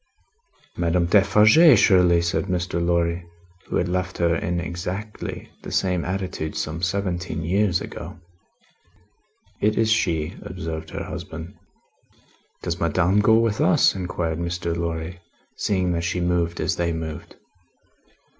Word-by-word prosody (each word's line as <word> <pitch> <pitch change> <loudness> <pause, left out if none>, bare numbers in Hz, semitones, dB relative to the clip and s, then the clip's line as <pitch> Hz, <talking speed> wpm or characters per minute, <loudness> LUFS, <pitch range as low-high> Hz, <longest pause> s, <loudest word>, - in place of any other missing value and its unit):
"Madame 85 0 +1
Defarge, 110 - +6
surely!" 90 -4 +4
said 85 - 0
Mr. 85 -1 -1
Lorry, 85 0 +1 0.4
who - - -4
had 90 - +1
left 90 0 -2
her 85 -1 +2
in 85 +1 -1
exactly 90 +5 -5
the - - -8
same 90 -2 0
attitude 90 -4 -3
some 80 +2 -3
seventeen 90 -3 -2
years 95 +1 +1
ago. 80 - -8 1.4
"It 105 +1 +2
is 110 -1 +2
she," 85 -7 +1
observed 80 -4 -6
her - - -5
husband. 80 +4 -7 1.1
"Does 85 0 -3
Madame 90 +4 +2
go 110 +2 +5
with 115 -2 +1
us?" 90 - +4
inquired 90 -3 -3
Mr. 85 -1 -2
Lorry, 85 +1 -4 0.4
seeing 95 -3 0
that 85 -1 -1
she 85 +1 -1
moved 85 -1 0
as - - 0
they 85 -1 0
moved. 80 0 -6
85 Hz, 130 wpm, -23 LUFS, 85-95 Hz, 1.4 s, Defarge